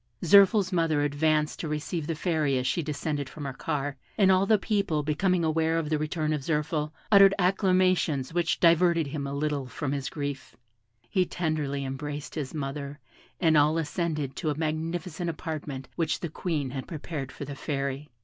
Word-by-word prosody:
Zirphil's 195 +1 +6
mother 160 -4 +2
advanced 150 +1 +1
to 165 - -3
receive 150 +1 -3
the 165 - -1
Fairy 155 -5 +1
as 125 - -1
she 130 +6 +1
descended 145 -2 -3
from 150 - -8
her 135 - -4
car, 145 -1 -3 0.2
and 195 -2 +5
all 190 +1 +3
the 215 - +5
people 195 -8 0
becoming 170 +4 +1
aware 160 +1 +1
of 160 -2 -2
the 155 - +2
return 155 0 -1
of 150 - -2
Zirphil, 150 +1 -1 0.2
uttered 195 -1 +8
acclamations 185 -7 +2
which 175 0 +1
diverted 170 -1 +4
him 140 0 -4
a 140 - -4
little 145 -2 -1
from 140 +2 -4
his 140 -2 -2
grief; 145 -2 -5 0.5
he 185 +8 +2
tenderly 155 -6 -2
embraced 145 +2 -5
his 145 -5 -4
mother, 140 -1 -5 0.4
and 160 -3 +4
all 150 +2 +4
ascended 155 -3 -2
to 160 - -1
a 150 - -2
magnificent 165 +2 -2
apartment 150 -5 -5
which 165 -2 0
the 170 - -3
Queen 150 -5 -2
had 130 -1 -5
prepared 150 -4 -5
for 140 - -7
the 140 - -6
Fairy. 140 0 -3
155 Hz, 180 wpm, -27 LUFS, 145-170 Hz, 0.5 s, uttered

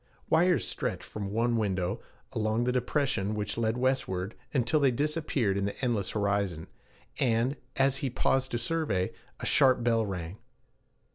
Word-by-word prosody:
Wires 165 - +4
stretched - - -3
from 100 -2 -5
one 115 +3 +1
window, 95 -4 -1 0.3
along 110 +1 0
the 125 - +1
depression 125 -5 0
which 105 -1 -2
led 115 0 0
westward, 115 -7 0 0.2
until 130 +3 +2
they 140 -2 +4
disappeared 140 -6 0
in 100 - 0
the 100 - -4
endless 120 -7 0
horizon; 100 -5 0 0.5
and, 120 +2 +2 0.2
as 135 0 +3
he 140 -1 -1
paused 130 +2 +1
to 120 - -1
survey, 120 - 0 0.3
a - - -3
sharp 130 -3 +4
bell 115 -1 +3
rang. 95 -2 -5
115 Hz, 150 wpm, -29 LUFS, 100-130 Hz, 0.5 s, Wires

